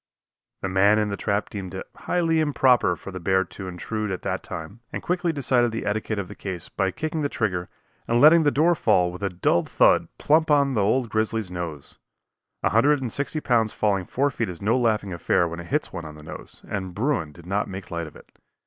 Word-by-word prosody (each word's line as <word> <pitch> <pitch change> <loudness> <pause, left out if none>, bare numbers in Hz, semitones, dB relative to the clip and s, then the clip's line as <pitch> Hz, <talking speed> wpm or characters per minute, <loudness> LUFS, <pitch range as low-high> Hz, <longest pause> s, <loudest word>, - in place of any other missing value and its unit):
The - - 0
man 95 +3 +4
in 105 -1 +1
the 100 - -2
trap 100 0 -1
deemed 95 -3 -6
it 95 - -5
highly 165 -2 0
improper 130 - +3
for 100 - -9
the 95 - -6
bear 95 +2 +2
to 95 +1 -9
intrude 105 +4 -4
at 95 -2 -4
that 95 -1 -2
time, 90 +5 -8
and - - -5
quickly 180 -1 0
decided 125 -5 +2
the 115 - -4
etiquette 105 +1 -1
of 100 -2 -3
the - - -9
case 95 -4 -6
by 95 -1 0
kicking 155 - -3
the 145 - 0
trigger 90 -8 -2 0.4
and 120 +1 +2
letting 160 +5 +8
the 150 - +4
door 160 +5 +3
fall 90 - +2
with 90 - -9
a 100 - 0
dull 85 -1 +1
thud - - +3
plump 155 +2 +3
upon 140 -2 +4
the 110 - +1
old 115 +4 +1
grizzly's 110 -3 -1
nose. 85 -5 -6 0.6
A - - +3
hundred 140 +6 +4
and 125 -4 -3
sixty 145 +2 -1
pounds 115 -5 +2
falling 100 -3 0
four 140 +2 +1
feet 115 -5 -2
is 85 -2 -7
no 110 +4 +1
laughing 110 -6 +1
affair 85 0 +1
when 85 +1 -6
it 85 - -8
hits 150 +2 -1
one 85 -3 -5
on 75 -1 -9
the 75 - -13
nose, 80 - -10
and 95 -3 -4
bruin 115 - 0
did 85 +3 -15
not 100 +3 -1
make 95 -1 -8
light 85 -1 -3
of 75 - -13
it. - - -16
105 Hz, 230 wpm, -24 LUFS, 90-130 Hz, 0.6 s, letting